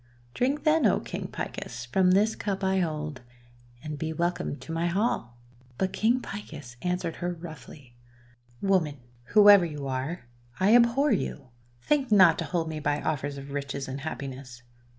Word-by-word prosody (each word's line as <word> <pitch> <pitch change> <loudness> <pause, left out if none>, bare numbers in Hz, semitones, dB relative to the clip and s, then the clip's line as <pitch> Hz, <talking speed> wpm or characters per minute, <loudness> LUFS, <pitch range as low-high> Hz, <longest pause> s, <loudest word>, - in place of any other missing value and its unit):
Drink, 270 - 0
then, 310 -5 +4
O 195 - +2
King - - -5
Picus, 120 0 -6
from 180 +10 +2
this 210 +3 +3
cup 200 -1 -3
I 190 0 +2
hold, 155 -5 -3 0.6
and 150 -2 -6
be 160 +1 -2
welcomed 170 -2 -2
to - - -8
my 165 +1 0
hall!" 175 - -1 0.4
But 190 -1 -1
King 235 +4 +2
Picus 150 - -8
answered 180 -2 -2
her 175 0 -2
roughly: 155 -6 -11 0.2
— 120 0 -30
* 120 0 -30
Woman, 160 -7 +2 0.3
whoever 205 - +7
you 150 -4 -4
are, 135 +5 -3 0.3
I 200 +5 +5
abhor 245 +5 +4
you! 145 - -2 0.3
Think 275 -5 +1
not 185 -6 +6
to 165 - -2
hold 165 +2 -1
me 160 -1 -4
by 145 0 0
offers 145 -2 -2
of 140 0 -9
riches 140 -1 -4
and 135 +1 -5
happiness! 135 -4 -7
160 Hz, 170 wpm, -27 LUFS, 140-195 Hz, 0.6 s, whoever